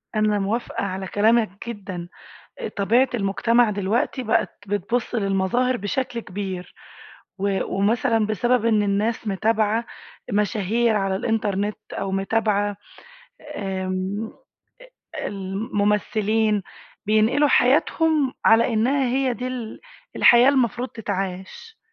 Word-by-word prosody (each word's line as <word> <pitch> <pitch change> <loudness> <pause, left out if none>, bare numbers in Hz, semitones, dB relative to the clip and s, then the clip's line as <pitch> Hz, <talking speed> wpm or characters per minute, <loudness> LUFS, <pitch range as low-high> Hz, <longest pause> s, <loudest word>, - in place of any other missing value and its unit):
أنا 215 -1 +2
موافِقة 210 +4 -2
على 190 -1 -4
كلامَك 215 0 +1
جدًّا، 190 -6 -6 0.5
آآ، 485 - -4
طبيعة 230 +6 +2
المجتمع 230 +3 +2
دلوقتي 205 +6 -1
بقِت 225 -2 -1
بتبُصّ 205 +5 -2
للمظاهر 205 +5 +1
بشكل 240 +3 -3
كبير، 185 -2 -6 0.6
و 195 0 0
ومثلًا 225 +2 +1
بسبب 240 +3 +1
إن 215 -2 +3
الناس 210 +3 -1
متابِعة 220 +3 +1 0.5
مشاهير 215 +2 +1
على 195 -1 0
الإنترنت، 210 -1 -1
أو 195 - -3
متابِعة 205 +1 0 0.8
آمم، 190 +2 -3 0.8
ال - - -4
الممثِّلين، 210 +1 0 0.4
بينقلوا 225 +7 +3
حياتهم 295 +2 +2
على 230 +2 +5
إنها 260 +5 +2
هي 255 0 +1
دي 250 - -5
ال 245 -3 -6 0.4
الحياة 240 +2 +7
المفروض 250 -2 +1
تتعاش. 195 - -5
215 Hz, 105 wpm, -23 LUFS, 195-235 Hz, 0.8 s, الحياة